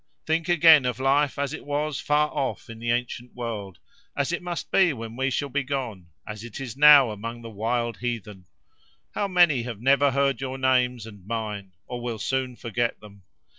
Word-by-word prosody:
"Think 160 +1 0
again 160 -5 +7
of 125 - -3
life 140 +2 +2
as 140 0 -2
it - - -7
was 145 0 -2
far 150 +1 +1
off 130 -3 -3
in 115 - -10
the 120 0 -4
ancient 120 0 -2
world; 110 -6 -5 0.4
as 140 +2 0
it 175 - -2
must 175 -1 -5
be 180 -5 +4
when 115 -2 -8
we 135 +2 0
shall 140 +2 -1
be 145 +2 0
gone; 125 -10 -4 0.2
as 105 0 -7
it 120 0 -8
is 125 -5 -6
now 145 -4 +7
among 115 +3 -7
the 115 - -8
wild 115 +1 -2
heathen. 110 -6 -5 0.7
How 205 - -1
many 175 -8 +4
have 115 -3 -6
never 140 +3 +4
heard 135 -1 0
your 135 0 -4
names 125 -3 +1
and 100 -4 -13
mine, 105 -4 -4
or 125 -1 -6
will 120 -2 -4
soon 130 +3 -2
forget 120 0 -2
them! 100 -1 -15
125 Hz, 195 wpm, -25 LUFS, 115-140 Hz, 0.7 s, again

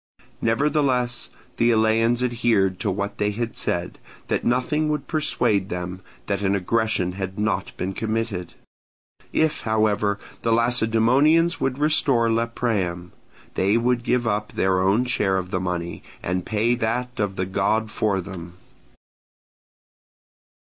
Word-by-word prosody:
Nevertheless 125 0 +1 0.3
the 120 0 +3
Eleans 115 +2 +3
adhered 115 -6 +1
to 105 - -1
what 100 +1 -3
they 105 - +2
had 115 +2 -3
said, 85 0 -2 0.3
that - - 0
nothing 150 +5 +1
would 150 -2 -2
persuade 110 - 0
them 90 +1 -5 0.2
that 100 -1 -1
an 100 0 +1
aggression 100 -1 0
had 95 0 -5
not 105 +1 -1
been 95 +1 -3
committed; 110 -5 -3 0.8
if, 155 -1 +1
however, 105 -2 +1 0.2
the 115 - 0
Lacedaemonians 125 +8 +3
would 135 -1 -1
restore 140 -6 +3
Lepreum, 110 -7 -1 0.4
they 100 +4 +2
would 120 +1 +1
give 125 0 +1
up 105 -1 -1
their 95 -1 +2
own 100 +6 +2
share 95 -6 +1
of 90 0 -4
the 95 - 0
money 90 -1 -3 0.2
and 90 0 -2
pay 110 +3 +2
that 125 +1 -2
of 100 -2 -1
the 95 - -1
god 100 +3 0
for 100 -3 0
them. 85 -2 -9
110 Hz, 135 wpm, -23 LUFS, 95-120 Hz, 0.8 s, the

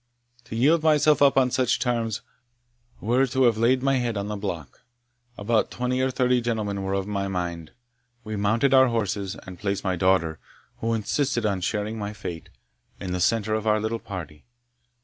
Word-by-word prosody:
To 115 - -7
yield 150 +8 +4
myself 150 -1 +4
up 140 -1 +5
on 130 -2 +4
such 125 -1 +2
terms, 115 -4 -1 0.8
were 125 +5 +2
to 130 +1 +1
have 120 -3 +4
laid 125 +3 +3
my 135 -1 +3
head 120 -3 -1
on 100 +1 -3
the 105 - -3
block. 85 -9 -6 0.6
About 110 +2 +1
twenty 125 +1 -1
or 130 - +2
thirty 125 -1 +2
gentlemen 110 -4 -2
were 95 0 -1
of 95 -1 -1
my 100 -1 -2
mind: 85 -4 -4 0.5
we 110 -1 -5
mounted 110 +7 +2
our 130 0 +7
horses, 100 -4 -2
and 90 -2 -10
placed 100 -1 -2
my 95 -2 0
daughter, 85 -3 +1 0.4
who 115 0 -1
insisted 120 +2 -1
on 100 -3 0
sharing 105 +4 -2
my 105 0 -4
fate, 85 -5 -7 0.5
in 90 -2 -4
the 90 - -2
centre 110 +2 +1
of 110 0 -1
our 110 0 +3
little 110 +2 -2
party. 80 -8 -8
110 Hz, 185 wpm, -25 LUFS, 100-125 Hz, 0.8 s, our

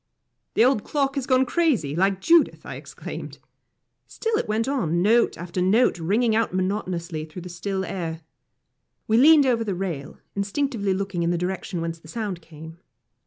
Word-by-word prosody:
"The 230 - +5
old 255 -5 +2
clock 275 -2 0
has 275 -2 -3
gone 260 0 +4
crazy, 250 - +1
like 190 +2 +1
Judith," 335 - +3
I - - -6
exclaimed. - - -8 0.7
Still 450 -1 -2
it - - -2
went 220 +3 0
on, 175 - 0
note 230 +4 +3
after 175 +1 -4
note 200 +2 +3
ringing 215 +7 +2
out 225 -4 0
monotonously 185 -4 -2
through 160 +3 -9
the 180 - -8
still 190 +2 -3
air. 165 -4 -4 0.9
We 220 - +3
leaned 295 +2 +7
over 240 -3 +2
the 200 -4 -2
rail, 175 -7 -4 0.2
instinctively 205 0 -1
looking 195 -2 -3
in 170 - +1
the 175 - +1
direction 180 0 -3
whence 165 0 -4
the 160 - -16
sound 200 -2 -4
came. 160 +1 -12
195 Hz, 170 wpm, -24 LUFS, 175-240 Hz, 0.9 s, leaned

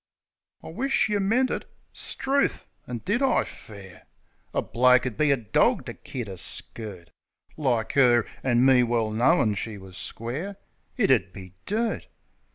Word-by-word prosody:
"I - - -8
wish't 260 +8 +1
yeh 205 -1 +1
meant 235 +7 +2
it." - - -4 0.2
'Struth! 275 +1 -1 0.2
And 120 -2 -6
did 210 +7 +1
I, 270 -2 +3
fair? 100 -4 -12 0.4
A - - -1
bloke 125 +1 +4
'ud 125 -4 -3
be 155 -1 +2
a 140 - +4
dawg 115 -4 +1
to - - -6
kid 120 -4 -7
a 95 -2 -7
skirt 100 -1 -5 0.4
Like 125 -7 0
'er. 120 -4 +5 0.2
An' 125 -1 +3
me 130 -2 +6
well 115 -2 0
knowin' 120 +1 +3
she 105 +1 -4
was 95 -1 -12
square. 150 - -5 0.4
It 215 - +3
'ud 100 -8 +2
be 95 -2 -10
dirt! 220 +2 -1
125 Hz, 160 wpm, -26 LUFS, -, 0.4 s, me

